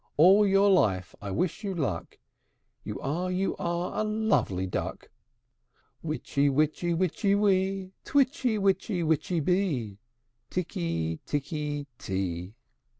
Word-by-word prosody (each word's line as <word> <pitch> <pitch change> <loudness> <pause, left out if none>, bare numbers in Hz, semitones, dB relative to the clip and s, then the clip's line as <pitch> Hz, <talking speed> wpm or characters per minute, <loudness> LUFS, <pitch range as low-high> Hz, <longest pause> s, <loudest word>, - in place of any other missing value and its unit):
All 195 +7 +7
your 195 +1 +5
life 95 - +2
I 100 - -5
wish 155 - -1
you 195 -2 -2
luck! 140 - -3 0.7
You 105 -2 -5
are, 170 +7 -1
you 185 +1 0
are, 175 +3 -2
a - - +1
lovely 215 - +1
duck! 95 - -4 0.9
Witchy 145 -2 0
witchy 155 +5 +1
witchy 190 +3 +1
wee, 195 -2 +1
Twitchy 260 -4 +2
witchy 195 -2 +1
witchy 160 +2 +1
bee, 145 - 0 0.5
Tikky 85 - -2
tikky 145 0 -2
tee! 95 0 -3
170 Hz, 115 wpm, -28 LUFS, 120-195 Hz, 0.9 s, All